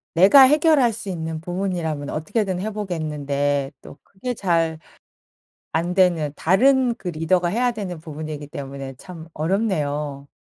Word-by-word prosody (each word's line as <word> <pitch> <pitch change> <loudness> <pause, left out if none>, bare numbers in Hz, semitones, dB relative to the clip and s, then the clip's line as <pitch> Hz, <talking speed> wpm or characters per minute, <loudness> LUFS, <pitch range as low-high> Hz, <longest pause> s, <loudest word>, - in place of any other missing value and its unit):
내가 195 +11 +8
해결할 295 -3 +4
수 205 -2 -7
있는 160 -3 -4
부분이라면 175 -5 -3
어떻게든 185 +4 -2
해 215 +4 -3
보겠는데 145 -8 -2
또 - - -13
그게 245 +6 -6
잘 165 -6 0 0.9
안되는 170 -2 +2
다른 250 - +3
그 200 - -7
리더가 175 +2 +1
해야 245 +6 +1
되는 195 -6 -5
부분이기 155 -1 -7
때문에 140 -3 -7
참 165 +4 -11
어렵네요. 150 -6 -1
170 Hz, 295 characters per minute, -22 LUFS, 150-200 Hz, 0.9 s, 내가